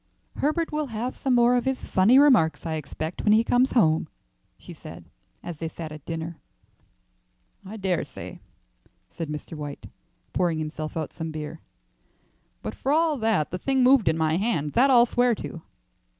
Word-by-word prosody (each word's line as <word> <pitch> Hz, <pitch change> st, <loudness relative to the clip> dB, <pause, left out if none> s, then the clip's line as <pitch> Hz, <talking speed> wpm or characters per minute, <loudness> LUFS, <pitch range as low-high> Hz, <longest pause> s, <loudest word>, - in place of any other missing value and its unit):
"Herbert 320 Hz, +3 st, 0 dB
will 305 Hz, -1 st, -2 dB
have 240 Hz, +2 st, -4 dB
some 260 Hz, -2 st, 0 dB
more 240 Hz, +1 st, +5 dB
of 245 Hz, -, 0 dB
his 265 Hz, 0 st, -1 dB
funny 200 Hz, +7 st, +4 dB
remarks, 250 Hz, -, +4 dB
I 160 Hz, -, -2 dB
expect, 155 Hz, +2 st, -5 dB
when 210 Hz, -, +4 dB
he 220 Hz, +1 st, +5 dB
comes 245 Hz, +2 st, +2 dB
home," 160 Hz, -10 st, +3 dB, 0.5 s
she -, -, -11 dB
said, -, -, -11 dB, 0.4 s
as 175 Hz, -3 st, -6 dB
they 165 Hz, -, -4 dB
sat 160 Hz, -1 st, -7 dB
at 155 Hz, -2 st, -11 dB
dinner. 165 Hz, 0 st, -5 dB, 1.2 s
"I 205 Hz, +3 st, -8 dB
dare 190 Hz, -4 st, 0 dB
say," -, -, -10 dB, 0.7 s
said 165 Hz, -3 st, -6 dB
Mr. 150 Hz, +2 st, -6 dB
White, 145 Hz, -2 st, -7 dB, 0.5 s
pouring 175 Hz, -3 st, +1 dB
himself 155 Hz, 0 st, -5 dB
out 155 Hz, -2 st, -4 dB
some 160 Hz, -1 st, -5 dB
beer; 155 Hz, 0 st, -7 dB, 1.0 s
"but -, -, -4 dB
for 270 Hz, -, -2 dB
all 320 Hz, 0 st, +3 dB
that, 220 Hz, -9 st, +1 dB
the 180 Hz, -, -4 dB
thing 265 Hz, +5 st, +1 dB
moved 255 Hz, -5 st, +5 dB
in 160 Hz, -, 0 dB
my 160 Hz, 0 st, +1 dB
hand; 175 Hz, -9 st, -1 dB
that 265 Hz, +4 st, +4 dB
I'll 240 Hz, -2 st, +7 dB
swear 245 Hz, 0 st, +2 dB
to." 170 Hz, -, -7 dB
185 Hz, 175 wpm, -25 LUFS, 160-250 Hz, 1.2 s, I'll